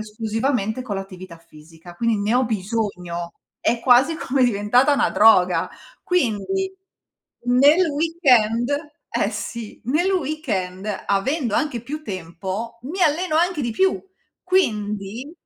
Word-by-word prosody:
esclusivamente 220 +2 -2
con 215 -6 -4
l'attività 185 -2 -8
fisica. 165 +1 -16
Quindi 230 +4 0
ne 205 +3 0
ho 255 +1 +3
bisogno, 185 -5 -3 0.3
è 235 - +1
quasi 255 +6 +4
come 265 -3 0
diventata 245 +4 +3
una - - +1
droga. 185 -5 +4 0.3
Quindi 360 - -1 0.7
nel 285 +9 +5
weekend 265 -7 +2 0.4
eh, - - 0
sì, 235 -3 -6
nel 305 - +1
weekend 245 - -2 0.2
avendo 235 +4 0
anche 295 -6 0
più 300 +5 -6
tempo, 190 - -6
mi 340 +9 -3
alleno 315 +1 +2
anche 345 0 +1
di 235 -4 -1
più. 380 - +1 0.4
Quindi 215 - -1
235 Hz, 120 wpm, -22 LUFS, 200-295 Hz, 0.7 s, nel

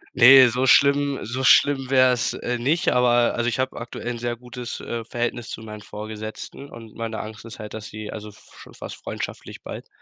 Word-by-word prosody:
Ne, 130 +1 +9
so 125 +3 0
schlimm 140 +1 +4
so 125 +4 -4
schlimm 135 -1 +4
wäre 130 -1 +5
es, 120 - -1
äh, 125 0 -3
nicht, 150 +8 +1
aber 120 -1 +3
also 120 0 -1
ich 120 - -1
hab 130 0 -1
aktuell 115 0 -7
'n 120 - -4
sehr 120 0 -3
gutes, 125 0 -8
äh, 115 -1 -5
Verhältnis 120 0 -3
zu - - -7
meinen 105 -1 -9
Vorgesetzten 110 +5 -8
und 115 -2 -12
meine 115 -1 -4
Angst 110 +1 -8
ist 115 - -10
halt, 105 0 -8
dass 110 -1 -7
sie 110 -1 -7
also 105 -1 -7
f 105 - -19
schon - - -14
fast - - -8
freundschaftlich - - -7
bald - - -8
120 Hz, 210 wpm, -23 LUFS, 110-130 Hz, -, Ne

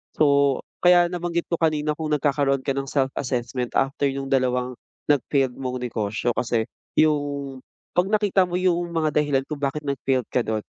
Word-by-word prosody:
So, 140 -2 +3 0.2
kaya 175 -1 +6
nabanggit 175 -1 -2
ko 170 - 0
kanina 155 -2 +1
kung 155 -1 -3
nagkakaroon 140 -2 +1
ka 135 - 0
ng 135 0 -2
self-assessment 125 -2 -2
after 135 +1 +1
'yung 135 0 -3
dalawang 125 -1 +1 0.4
nag-failed 135 -2 +2
mong 130 -1 -3
negosyo, 110 -1 -1
kasi 115 -2 0 0.3
'yung 145 -3 +1 0.3
'pag 180 +2 +2
nakita 205 -3 +2
mo 175 - -4
'yung 175 -1 +1
mga 160 -3 0
dahilan 145 -3 +2
kung 150 -2 -6
bakit 145 +2 -2
nag-failed 135 -2 0
ka 125 - +2
do'n, 110 -2 -2
140 Hz, 160 wpm, -24 LUFS, 130-155 Hz, 0.4 s, kaya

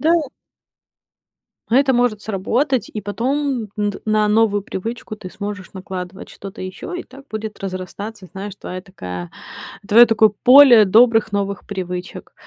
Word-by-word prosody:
Да. 320 +2 +3 1.6
А 240 - +4
это 270 0 +4
может 240 -4 +1
сработать 235 +6 -1
и 215 - -4
потом 250 +2 -2
н 205 -1 0
д 205 - -9
на 215 0 +2
новую 210 -2 +2
привычку 215 +3 -6
ты 185 - -9
сможешь 200 -2 -7
накладывать 185 0 -7
что-то 195 -1 -9
ещё. 185 - -7
И 355 - -4
так 275 +1 -15
будет 215 0 -5
разрастаться, 195 +2 -6
знаешь, 195 +1 -7
твоя 185 -1 -7
такая 90 - -8 0.6
твоё 235 +3 +8
такое 220 -2 +4
поле 250 -4 +8
добрых 225 +1 +4
новых 200 -1 -3
привычек. 180 -2 -6
210 Hz, 145 wpm, -20 LUFS, 190-235 Hz, 1.6 s, твоё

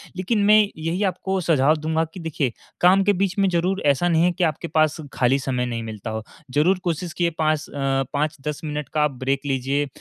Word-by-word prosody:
लेकिन 190 +4 0
मैं 210 - +7 0.2
यही 165 +5 -2
आपको 190 0 -1
सुझाव 155 -3 +3
दूँगा 160 +1 0
कि 185 - -8
देखिए 155 -6 -2 0.3
काम 185 +2 +5
के 205 +1 +3
बीच 195 +1 -1
में 195 - +4
ज़रूर 180 +3 0
ऐसा 145 +5 +3
नहीं 165 0 +3
है 180 - +3
कि 180 +1 -2
आपके 160 0 -1
पास 155 0 +2 0.2
खाली 130 +2 +2
समय 130 -2 -1
नहीं 115 -2 -4
मिलता 110 -1 -6
हो। 110 0 -4 0.3
ज़रूर 180 +6 +3
कोशिश 170 -1 -2
किए 175 -1 +1
5 155 -1 +1
अ, 135 -1 0
5-10 150 0 -2
मिनट 150 -3 -4
का 150 -1 +3
ब्रेक 135 0 -2
लीजिए, 140 +1 0
155 Hz, 205 wpm, -23 LUFS, 135-175 Hz, 0.3 s, मैं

